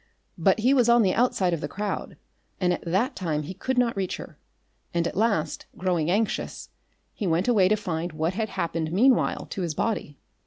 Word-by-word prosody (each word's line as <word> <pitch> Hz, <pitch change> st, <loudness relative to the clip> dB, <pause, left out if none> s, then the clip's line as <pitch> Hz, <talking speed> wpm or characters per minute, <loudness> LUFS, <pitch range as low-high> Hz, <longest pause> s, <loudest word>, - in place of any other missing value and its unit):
But 220 Hz, -, +3 dB
he 255 Hz, +5 st, +4 dB
was 245 Hz, -4 st, +4 dB
on 235 Hz, -1 st, +6 dB
the 185 Hz, -2 st, +2 dB
outside 200 Hz, -7 st, +2 dB
of 165 Hz, -, -2 dB
the -, -, -2 dB
crowd 205 Hz, +1 st, -4 dB, 0.4 s
and 180 Hz, -1 st, +2 dB
at -, -, -5 dB
that 200 Hz, -, 0 dB
time 155 Hz, -5 st, -2 dB
he 160 Hz, -, -6 dB
could 260 Hz, +7 st, -3 dB
not 240 Hz, -2 st, +2 dB
reach 190 Hz, -2 st, -2 dB
her, -, -, -11 dB, 0.6 s
and 170 Hz, 0 st, +2 dB
at -, -, -3 dB
last, 205 Hz, -6 st, 0 dB
growing 175 Hz, -4 st, 0 dB
anxious, 210 Hz, +4 st, -1 dB, 0.4 s
he 205 Hz, -, -3 dB
went 170 Hz, +4 st, +1 dB
away 210 Hz, -7 st, +5 dB
to 210 Hz, -, +3 dB
find 175 Hz, -4 st, -3 dB
what 160 Hz, +3 st, -1 dB
had 220 Hz, +2 st, -2 dB
happened 165 Hz, -3 st, -2 dB
meanwhile 245 Hz, +8 st, +3 dB
to 195 Hz, -, -3 dB
his 165 Hz, -4 st, -2 dB
body. 150 Hz, -10 st, -2 dB
185 Hz, 200 wpm, -26 LUFS, 170-225 Hz, 0.6 s, on